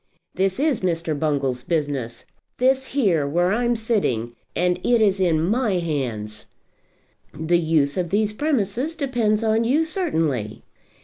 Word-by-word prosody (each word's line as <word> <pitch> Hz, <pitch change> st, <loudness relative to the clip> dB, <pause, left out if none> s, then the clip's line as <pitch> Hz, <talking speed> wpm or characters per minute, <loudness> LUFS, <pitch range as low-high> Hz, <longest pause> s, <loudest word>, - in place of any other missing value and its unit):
"This 190 Hz, +3 st, 0 dB
is 290 Hz, -5 st, +1 dB
Mr. 170 Hz, -3 st, -1 dB
Bungall's 140 Hz, -4 st, -1 dB
business; 145 Hz, -7 st, -3 dB, 0.3 s
this 265 Hz, +1 st, +2 dB
here, 185 Hz, -, +1 dB
where 175 Hz, +5 st, +1 dB
I'm 240 Hz, +2 st, +1 dB
sitting, 165 Hz, -, -1 dB, 0.2 s
and 180 Hz, 0 st, +1 dB
it 240 Hz, -1 st, +3 dB
is 200 Hz, -3 st, +2 dB
in 170 Hz, -4 st, +2 dB
my 215 Hz, +6 st, +1 dB
hands." 125 Hz, -11 st, -3 dB, 0.9 s
"The 160 Hz, +3 st, +1 dB
use 155 Hz, -3 st, +1 dB
of 175 Hz, -2 st, -1 dB
these 210 Hz, +2 st, +1 dB
premises 265 Hz, -, -1 dB
depends 240 Hz, -7 st, 0 dB
on 220 Hz, +1 st, +2 dB
you 285 Hz, +8 st, +2 dB
certainly." 160 Hz, -, -2 dB
185 Hz, 135 wpm, -22 LUFS, 150-235 Hz, 0.9 s, it